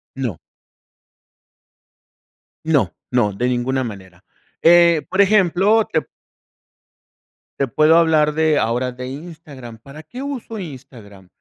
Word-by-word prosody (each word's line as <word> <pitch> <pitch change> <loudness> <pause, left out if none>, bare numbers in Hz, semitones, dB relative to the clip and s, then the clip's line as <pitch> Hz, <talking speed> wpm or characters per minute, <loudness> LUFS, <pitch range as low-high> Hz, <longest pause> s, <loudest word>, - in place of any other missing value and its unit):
No. - - -4 2.2
No 160 -3 0 0.2
no, 120 -5 +1
de 120 +6 -2
ninguna 125 +1 -1
manera. 95 -5 -10 0.4
Eh, 170 -1 +5
por 190 - -3
ejemplo, 200 +1 +3
te 160 - +2 1.6
te 140 - +1
puedo 155 +6 +3
hablar 160 -2 +3
de 155 -1 +2
ahora 125 +2 -1
de 125 +1 -8
Instagram, 140 -5 -10
¿para 140 +6 -12
qué 245 - -9
uso 260 -5 -6
Instagram? 125 - -12
145 Hz, 110 wpm, -19 LUFS, 125-170 Hz, 2.2 s, Eh